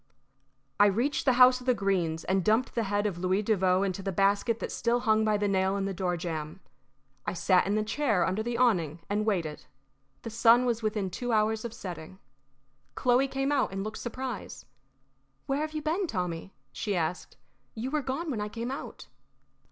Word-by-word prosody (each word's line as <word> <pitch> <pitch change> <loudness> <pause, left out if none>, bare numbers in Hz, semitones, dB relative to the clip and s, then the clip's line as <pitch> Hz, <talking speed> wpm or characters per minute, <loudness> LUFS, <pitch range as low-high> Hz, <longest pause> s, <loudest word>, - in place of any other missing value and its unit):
I 205 - +7
reached 235 +9 0
the 260 - +5
house 255 0 +7
of 250 - -13
the 250 - +4
Greenes 180 -6 0
and 190 0 +1
dumped 220 +5 +2
the 230 -2 0
head 205 +1 0
of 190 -5 -2
Louis 185 +3 +1
Devoe 190 -3 +2
into 195 -1 -2
the 195 0 -3
basket 200 +5 +2
that - - -5
still 240 +1 0
hung 220 -2 +3
by 215 -1 +2
the 205 0 0
nail 190 0 +1
in 195 - -1
the 195 - -2
door 180 -1 -1
jamb. 160 -1 -5 0.7
I - - 0
sat 180 +1 +3
in 205 +2 +1
a 215 - +1
chair 220 -5 +1
under 190 +4 -1
the 235 +1 -2
awning 175 - +1
and 210 +1 0
waited. 170 -8 -1 0.6
The 230 - -6
sun 235 +2 +5
was 235 -2 0
within 210 -3 -1
two 245 +6 -3
hours 215 0 +1
of 235 - -4
setting. 180 -4 -8 0.8
Chloe 250 +2 +3
came 270 +1 -1
out 275 -8 +1
and 195 0 -3
looked 215 +1 -5
surprised. 250 -1 -6 0.8
"Where 275 +1 -1
have 310 0 -3
you 305 -1 -4
been, 345 +5 0
Tommy?" 180 - -3 0.2
she 205 -3 -2
asked. 170 +1 -3 0.4
"You 240 +4 -4
were 305 0 0
gone 285 +5 -3
when 220 -5 -2
I 210 - -3
came 235 +3 -4
out." 275 - -7
215 Hz, 200 wpm, -28 LUFS, 190-245 Hz, 0.8 s, I